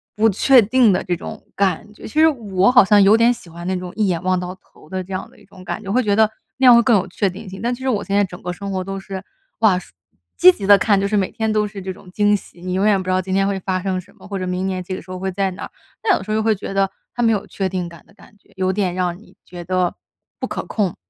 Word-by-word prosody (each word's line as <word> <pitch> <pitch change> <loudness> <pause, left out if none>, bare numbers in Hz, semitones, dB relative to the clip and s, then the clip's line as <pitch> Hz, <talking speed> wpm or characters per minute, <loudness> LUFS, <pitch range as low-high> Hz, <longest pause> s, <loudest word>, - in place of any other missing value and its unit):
不 220 +1 +4
确 245 +5 +5
定 230 +1 +4
的 180 - +1
这 175 - -1
种 210 +4 -8
感 200 +2 -1
觉。 - - -17
其 300 - -2
实 320 - +7
我 205 -9 +1
好 250 0 +7
像 205 +1 +5
有 200 +2 +6
点 230 +2 +4
喜 205 -7 -13
欢 170 +1 -9
那 185 +1 -1
种 180 0 -7
一 215 - +1
眼 170 -3 -1
望 185 0 +1
到 180 0 -5
头 170 -4 -22
的 185 +1 -3
这 190 +1 -9
样 185 - -4
的 - - -22
一 - - -20
种 190 -2 -15
感 - - -5
觉， 195 - -8
会 255 +4 +2
觉 205 -2 +1
得 220 0 +4 0.3
那 260 - +2
样 245 - +9
会 235 - +6
更 235 -3 +4
有 185 - -2
确 195 +2 -1
定 200 +4 -10
性。 190 +1 -9
但 240 +2 0
其 245 - -7
实 265 - -3
我 210 -5 0
现 200 - -5
在 205 - +4
整 180 -1 -11
个 180 - -3
生 200 +2 -6
活 185 -1 -2
都 195 +1 -5
是 190 0 -7 0.4
哇， 205 -5 +4 0.6
积 185 - +8
极 195 +1 -6
地 205 0 +8
看， 200 0 +2
就 200 - 0
是 210 - -1
每 195 -2 +1
天 220 -1 -1
都 215 0 +2
是 200 -1 -7
这 190 0 -5
种 185 0 -16
惊 205 +2 +3
喜， 185 -3 -9
你 180 0 -4
永 190 +2 +1
远 205 -3 +3
不 185 - -9
知 - - -1
道 185 0 +2
今 185 0 -5
天 195 +1 +2
会 200 -1 -1
发 185 0 -1
生 185 -1 -2
什 200 +2 -22
么， - - -14
或 200 -1 -4
者 185 - -3
明 180 +1 -2
年 185 -1 -3
这 185 - -6
个 - - -5
时 - - -19
候 185 - -5
会 190 +1 -3
在 195 +1 0
哪 180 - -8
儿。 - - -8 0.3
但 405 -5 +3
有 - - -7
时 - - -13
候 - - +1
又 220 - +1
会 220 0 +3
觉 195 - -6
得 195 0 +1 0.2
它 240 - 0
没 225 - +4
有 205 -3 -1
确 195 -1 -3
定 180 -1 -3
感 170 -1 -14
的 - - -23
感 210 - -19
觉， - - -29
有 185 0 0
点 190 -3 0
让 180 -1 -1
你 215 - -20
觉 175 -1 -9
得 180 0 0 0.4
不 - - -2
可 - - -5
控。 200 -6 -1
195 Hz, 345 characters per minute, -20 LUFS, 185-210 Hz, 0.6 s, 样